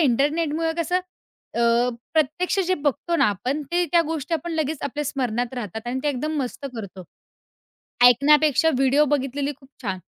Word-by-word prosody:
इंटरनेटमुळं 310 +4 +1
कसं, 340 +2 +1 0.6
अ, 235 +1 +3 0.3
प्रत्यक्ष 315 +5 +1
जे 370 - +2
बघतो 295 +3 -1
ना - - +4
आपण 250 +9 -2
ते 350 0 +3
त्या 340 - +6
गोष्टी 320 0 -2
आपण 330 +2 -3
लगेच 315 -1 -1
आपल्या 290 +2 -3
स्मरणात 245 -3 -2
राहतात 220 -1 -6
आणि 255 +2 -2
ते 295 - +1
एकदम 300 +3 -2
मस्त 260 +2 -6
करतो. 195 -4 -8 1.0
ऐकण्यापेक्षा 295 +4 +5
व्हिडिओ 270 +2 +4
बघितलेली 280 0 -1
खूप 270 - -19
छान. 190 -5 -2
285 Hz, 155 wpm, -23 LUFS, 245-315 Hz, 1.0 s, त्या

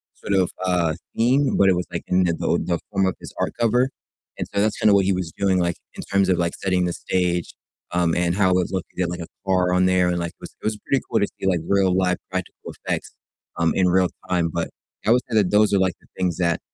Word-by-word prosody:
sort - - -4
of, 95 -2 +2
uh, 90 -3 +1 0.2
theme, 130 +5 +2
but 95 - +5
it 95 - +4
was 90 0 -2
like - - -4
in 90 0 +3
the 85 - +1
the - - -3 0.2
the 85 -1 0
form 95 -1 +2
of 95 - -1
his - - -10
art - - -1
cover, 120 +3 +3 0.5
and - - -2
so 100 - +2
that's 110 +1 +1
kinda 105 - +4
what 100 - +4
he 100 - +2
was 90 -3 -3
doing, 95 -2 +2
like, 85 -1 0 0.2
in - - -6
terms 100 -1 +1
of, 90 - +3
like, 85 -1 0
setting 90 -2 0
the 90 - -1
stage, 90 -1 -1 0.4
um, 85 -1 +1
and 85 0 +1
how 95 -2 +3
it - - +3
was 90 -1 0
looking, 95 -2 -3
he - - -2
had 85 - +1
like 90 0 -5
a 85 - -6 0.2
car 90 -2 +2
on 90 0 +3
there 90 -1 +3
and, 90 0 0
like, 85 -1 -3
it - - -43
was - - -8
it - - -10
was 110 -1 0
pretty 135 -2 +1
cool 115 - +2
to 100 - +2
see, 95 - -2
like, 90 -3 +2
real 95 -2 +3
live 90 -1 +2
practical - - -5
effects, - - -4 0.4
um, 85 -1 +2
in 95 - +3
real 90 0 +3 0.2
time, 85 -2 +1
but 85 -1 -2 0.4
I - - +5
would 125 +1 +5
say 115 - -2
that 100 -3 +3
those 105 0 +4
are 100 - +4
like 95 -2 +2
the - - -24
things 90 -3 0
that, 85 -2 +1
90 Hz, 275 wpm, -23 LUFS, 90-100 Hz, 0.5 s, but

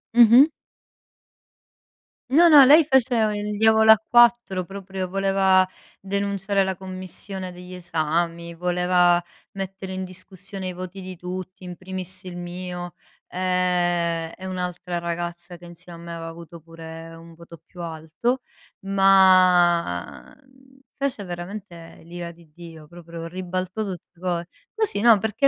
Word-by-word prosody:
Mh-mh. 240 +3 +8 1.8
No, 325 +6 +6
no, 290 -4 +9
lei 300 +5 +7
faceva 240 -6 +2
il 210 0 -3
diavolo 220 +1 +5
a 220 -1 +6
quattro 240 -6 +4
proprio, 195 0 -6
voleva 190 0 +2 0.3
denunciare 200 0 -1
la 190 0 -2
commissione 185 0 -7
degli 180 +1 -11
esami, 170 0 -2
voleva 180 0 +2 0.3
mettere 195 0 -6
in 190 0 -4
discussione 185 +1 -7
i - - -6
voti 185 +1 -8
di 185 0 -8
tutti, 185 +1 -7
in 180 0 -7
primis 185 +1 -6
il 180 -1 -8
mio, 175 0 -7 0.3
ehm, 175 -2 0
e 185 - -10
un'altra 180 -1 -4
ragazza 175 +1 -5
che 175 - -15
insieme 175 0 -12
a - - -12
me 170 0 -7
aveva 165 0 -6
avuto 170 0 -12
pure 165 0 -11
un 165 0 -14
voto 170 -1 -14
più 175 - -12
alto, 165 +10 -3 0.4
ma 185 - +3 0.6
fece 275 -7 -2
veramente 175 -2 -9
l'ira 170 0 -7
di 170 -1 -20
Dio, 165 -1 -12
proprio 170 0 -9
ribaltò 185 +3 -4
tutte 180 -4 -8
co 175 -1 -2 0.3
così, 435 - +1
no, 230 -2 +6
perché 220 +7 +1
185 Hz, 130 wpm, -23 LUFS, 170-195 Hz, 1.8 s, no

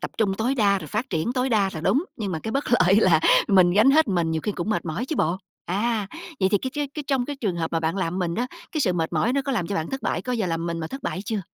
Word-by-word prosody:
tập - - -4
trung 200 -4 +2
tối 235 +6 0
đa 200 -5 +3
rồi - - -8
phát 230 +5 -3
triển 165 +7 -1
tối 255 0 0
đa 205 -5 +2
là 160 - -4
đúng, 235 - +2
nhưng 205 -6 -3
mà 160 - -2
cái 220 - -5
bất 275 +1 0
lợi 190 -4 +5
là 165 -7 +4 0.3
mình 185 -3 +5
gánh 215 +8 +5
hết, 310 -1 +4
mình 170 -4 +1
nhiều 160 0 -1
khi 210 - -1
cũng 190 +3 -3
mệt 215 - -1
mỏi 170 +10 -3
chứ 315 - -3
bộ. 170 +3 +1 0.3
À, 210 +2 0 0.3
vậy 190 - +4
thì 205 - +4
cái 260 - -4
tr 295 - -5 0.2
cái 300 - -4
trong 270 -3 +1
cái 290 - -5
trường 205 -10 -2
hợp 165 -1 -3
mà 165 - +1
bạn 160 +3 -1
làm 185 -1 -1
mình 170 -2 -1
đó, 245 - -1 0.3
cái 310 - -1
sự 185 -10 +2
mệt 165 -1 -2
mỏi 170 +9 +1
nó 275 +1 +1
có 275 - -2
làm 200 -9 -1
cho 200 - -3
bạn 160 -2 -2
thất 270 0 -4
bại - - -1
có 255 - -5
bao 250 - +1
giờ 220 -5 -1
làm 165 -1 -2
mình 170 -1 -2
mà 160 - -3
thất 270 +10 -8
bại 185 - -3
chưa? 215 -2 -2
200 Hz, 330 wpm, -24 LUFS, 170-245 Hz, 0.3 s, lợi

